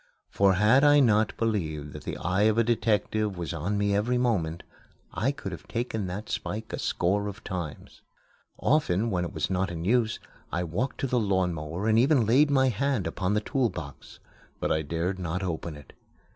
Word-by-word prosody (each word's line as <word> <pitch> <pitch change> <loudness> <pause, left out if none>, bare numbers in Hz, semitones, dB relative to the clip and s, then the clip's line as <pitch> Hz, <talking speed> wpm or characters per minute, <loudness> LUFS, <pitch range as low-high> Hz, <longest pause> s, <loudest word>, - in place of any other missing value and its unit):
For 100 -1 +4
had 110 +8 +5
I 145 0 +7
not 110 -5 +3
believed 80 -10 -2
that - - -9
the - - -4
eye 95 +5 +2
of 110 - 0
a 115 - +5
detective 110 -3 0
was 85 -1 -4
on 90 +6 -2
me 100 0 +1
every 120 +5 +1
moment, 90 -10 0 0.5
I 125 +6 +1
could 105 -9 -7
have 85 -5 -9
taken 115 -4 -2
that 95 +4 -5
spike 110 +2 -4
a - - -3
score 100 +4 0
of 100 - -7
times. 85 -6 -6 0.6
Often, 115 - +1
when 90 -2 0
it 85 - -4
was - - -2
not 95 +1 0
in 85 -1 -5
use, 115 +1 +2 0.3
I 85 +2 -1
walked 95 +11 -3
to 135 - 0
the 125 -1 +1
lawnmower 90 -3 -1
and 110 0 +4
even 130 -1 +4
laid 135 +7 +4
my 130 -2 +4
hand 125 -2 0
upon 95 +2 -1
the 105 - +1
tool 130 +1 0
box. 70 -7 -9 0.4
But - - -1
I 80 - +2
dared 85 +5 -2
not 90 +2 -3
open 85 -2 -3
it. 75 - -15
100 Hz, 195 wpm, -27 LUFS, 90-115 Hz, 0.6 s, I